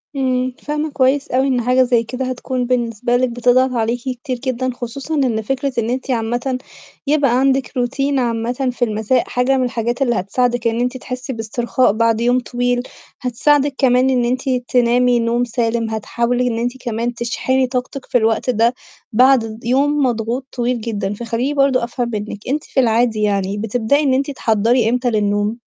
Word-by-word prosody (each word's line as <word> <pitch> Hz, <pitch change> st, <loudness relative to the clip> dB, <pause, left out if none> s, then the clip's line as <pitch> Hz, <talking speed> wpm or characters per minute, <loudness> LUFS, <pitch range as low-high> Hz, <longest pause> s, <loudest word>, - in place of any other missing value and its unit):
إمم، 255 Hz, -1 st, 0 dB
فاهمة 300 Hz, +1 st, -2 dB
كويس 275 Hz, +1 st, +2 dB
أوي 260 Hz, +2 st, +2 dB
إن 255 Hz, -2 st, +1 dB
حاجة 250 Hz, +2 st, +3 dB
زي 240 Hz, -2 st, +2 dB
كده 255 Hz, +3 st, -4 dB
هتكون 255 Hz, 0 st, -3 dB
بالنسبة 240 Hz, -1 st, 0 dB
لِك 255 Hz, 0 st, +1 dB
بتضغط 245 Hz, +2 st, +2 dB
عليكِ 235 Hz, 0 st, 0 dB
كتير 255 Hz, 0 st, -4 dB
جدًا، 255 Hz, -1 st, -1 dB
خصوصًا 255 Hz, +5 st, -6 dB
إن 250 Hz, -6 st, +1 dB
فكرة 270 Hz, +5 st, -2 dB
إن 230 Hz, -1 st, 0 dB
أنتِ 260 Hz, +2 st, -2 dB
عامةً 240 Hz, +2 st, -1 dB, 0.5 s
يبقى 275 Hz, -4 st, +3 dB
عندِك 270 Hz, -1 st, +2 dB
Routine 275 Hz, +3 st, -1 dB
عامةً 245 Hz, +2 st, -1 dB
في 245 Hz, 0 st, 0 dB
المساء 220 Hz, +3 st, 0 dB
حاجة 250 Hz, +2 st, +1 dB
من 260 Hz, -, +1 dB
الحاجات 240 Hz, 0 st, -2 dB
اللي 240 Hz, -3 st, +2 dB
هتساعدِك 240 Hz, +5 st, 0 dB
إن 230 Hz, 0 st, 0 dB
أنتِ 250 Hz, +1 st, -1 dB
تحسّي 255 Hz, +1 st, -6 dB
باسترخاء 235 Hz, +2 st, 0 dB
بعد 230 Hz, 0 st, +1 dB
يوم 245 Hz, +1 st, +3 dB
طويل، 245 Hz, +1 st, -1 dB, 0.4 s
هتساعدِك 280 Hz, +3 st, +2 dB
كمان 255 Hz, -1 st, +3 dB
إن 250 Hz, -2 st, +2 dB
أنتِ 255 Hz, +3 st, -1 dB, 0.2 s
تنامي 245 Hz, 0 st, +3 dB
نوم 235 Hz, +1 st, +1 dB
سالم، 230 Hz, -1 st, -1 dB
هتحاولي 235 Hz, +2 st, -1 dB
أنتِ 245 Hz, +2 st, -2 dB
كمان 240 Hz, -1 st, -3 dB
تشحني 255 Hz, +2 st, 0 dB
طاقتِك 255 Hz, +2 st, -4 dB
في 255 Hz, -, +1 dB
الوقت 225 Hz, +1 st, +1 dB
ده 235 Hz, 0 st, +3 dB, 0.4 s
بعد 235 Hz, -2 st, +3 dB
يوم 280 Hz, +5 st, +2 dB
مضغوط 240 Hz, +1 st, -1 dB
طويل 245 Hz, -1 st, -1 dB
جدًا، 210 Hz, -3 st, -3 dB
فخلّيني 235 Hz, +5 st, -2 dB
برضه 275 Hz, -3 st, +2 dB
أفهم 240 Hz, 0 st, -2 dB
منِّك، 210 Hz, -1 st, -4 dB
أنتِ 290 Hz, +4 st, -1 dB
في -, -, -2 dB
العادي 230 Hz, -2 st, +2 dB
يعني 200 Hz, -1 st, 0 dB
بتبدئي 225 Hz, +6 st, +1 dB
إن 270 Hz, -3 st, +2 dB
أنتِ 275 Hz, +2 st, 0 dB
تحضّري 230 Hz, -1 st, +2 dB
إمتى 250 Hz, +1 st, +1 dB
للنوم؟ 205 Hz, 0 st, 0 dB
245 Hz, 170 wpm, -18 LUFS, 230-260 Hz, 0.5 s, حاجة